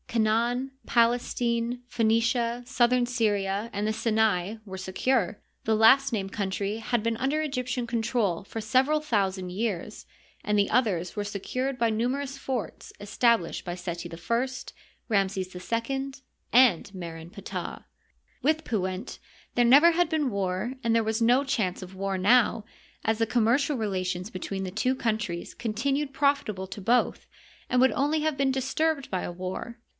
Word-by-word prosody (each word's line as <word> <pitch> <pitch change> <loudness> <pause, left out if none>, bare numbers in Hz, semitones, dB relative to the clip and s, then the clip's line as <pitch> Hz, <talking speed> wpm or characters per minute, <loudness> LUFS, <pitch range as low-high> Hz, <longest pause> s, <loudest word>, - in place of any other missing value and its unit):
Canaan, 235 +4 +1 0.2
Palestine, 235 0 +1
Phoe 245 -1 -2
nicia, 230 +2 +1
southern 245 -1 +3
Syria, 210 -3 0
and 205 +1 -2
the 215 - +1
Sinai, 215 -3 +1
were 190 -2 -7
secure. 195 +2 0 0.2
The 220 - +2
last 265 +5 +6
named 195 -4 -3
country 200 +1 -2
had 235 0 0
been 230 0 0
under 275 +6 0
Egyptian 250 -4 -2
control 225 -6 0
for 225 - -6
several 260 +7 +2
thousand 195 -10 -1
years, 210 0 -3 0.4
and 210 0 +1
the 200 - +2
others 185 -8 +1
were 205 - -1
secured 255 +7 -3
by 230 -2 +2
numerous 260 +5 -1
forts 260 -4 -4
established 205 -2 +1
by 175 -1 -4
Seti 175 -1 -5
I, 230 +10 -1 0.6
Ramses 190 -4 0
II, 230 +8 -2 0.4
and 225 -6 +4
Mer 170 -3 -6
en 165 +1 -10
Ptah. 200 +1 -6 0.6
With 310 +4 +1
Pewent 190 -1 -3 0.4
there 245 - +4
never 285 +8 +7
had 345 -1 +2
been 310 -4 +1
war 195 +4 -2
and 230 0 +2
there 225 -1 +2
was 220 +1 -1
no 245 +4 +4
chance 210 -10 -1
of 185 +1 -9
war 195 0 -2
now, 220 +2 +3 0.4
as 220 0 +1
the 225 - +2
commercial 250 +6 +2
relations 185 -3 -2
between 190 0 -4
the 185 - -5
two 250 +7 0
countries 215 -8 -2
continued 270 +5 -1
profitable 275 -10 0
to 195 +2 -8
both, 240 +6 +1 0.4
and 250 - +2
would 260 +1 +5
only 295 +3 +1
have 310 -1 0
been 275 -1 +1
disturbed 275 +2 0
by 185 -2 -1
a - - -4
war. 185 +7 -6
230 Hz, 155 wpm, -27 LUFS, 195-255 Hz, 0.6 s, never